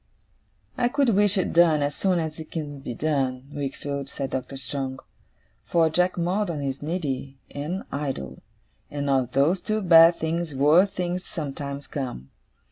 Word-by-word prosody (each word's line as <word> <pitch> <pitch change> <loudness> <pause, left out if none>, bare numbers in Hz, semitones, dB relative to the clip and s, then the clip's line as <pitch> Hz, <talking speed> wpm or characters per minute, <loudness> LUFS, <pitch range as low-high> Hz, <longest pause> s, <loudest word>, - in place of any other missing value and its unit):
'I 240 - +3
could 280 -1 +2
wish 205 -1 +3
it 185 - 0
done 165 -3 +5
as 145 0 -1
soon 185 +2 +1
as 160 -1 -3
it 155 - -8
can 145 -3 -5
be 125 -3 -6
done, 135 -4 -1
Wickfield,' 140 0 -4
said 135 -1 -4
Doctor 130 +1 -4
Strong, 135 -1 -4 0.6
'for 165 -2 +2
Jack 180 +3 +1
Maldon 175 -1 0
is 135 -1 -3
needy, 145 -4 -3
and 155 +7 -4
idle; 135 - -4 0.5
and 145 -1 -2
of 130 -2 +1
those 155 +7 +3
two 215 0 -1
bad 170 -3 +7
things, 160 -1 -2
worse 155 +8 +5
things 180 -1 -3
sometimes 140 -2 -5
come. 125 - -5
150 Hz, 155 wpm, -25 LUFS, 140-175 Hz, 0.6 s, bad